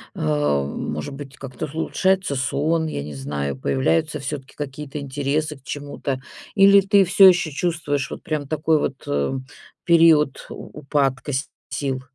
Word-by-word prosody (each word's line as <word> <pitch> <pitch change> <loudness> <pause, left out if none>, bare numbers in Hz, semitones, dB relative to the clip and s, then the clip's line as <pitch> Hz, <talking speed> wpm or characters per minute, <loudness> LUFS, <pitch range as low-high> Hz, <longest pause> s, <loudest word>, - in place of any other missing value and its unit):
А, 75 -2 +1
может 75 - -4
быть, 135 -1 -9
как-то 135 +2 -6
улучшается 190 -1 0
сон, 155 +5 0
я 70 - -4
не 75 0 -7
знаю, 70 0 -3
появляются 150 - 0
всё-таки 140 -1 -6
какие-то 145 0 -6
интересы 145 +2 -2
к 135 - -24
чему-то, 140 -2 -4 0.3
или 200 0 +7
ты 195 0 +4
всё 190 +2 +7
ещё 180 -3 +4
чувствуешь 145 -3 -1
вот - - -8
прям 150 -3 -3
такой 155 +1 +1
вот, 135 -2 -3
э, 70 - 0 0.5
период 165 -4 +4
у - - -9
упадка 135 -1 0
с 135 +4 -2 0.2
сил? 135 -2 -2
145 Hz, 150 wpm, -22 LUFS, 130-160 Hz, 0.5 s, или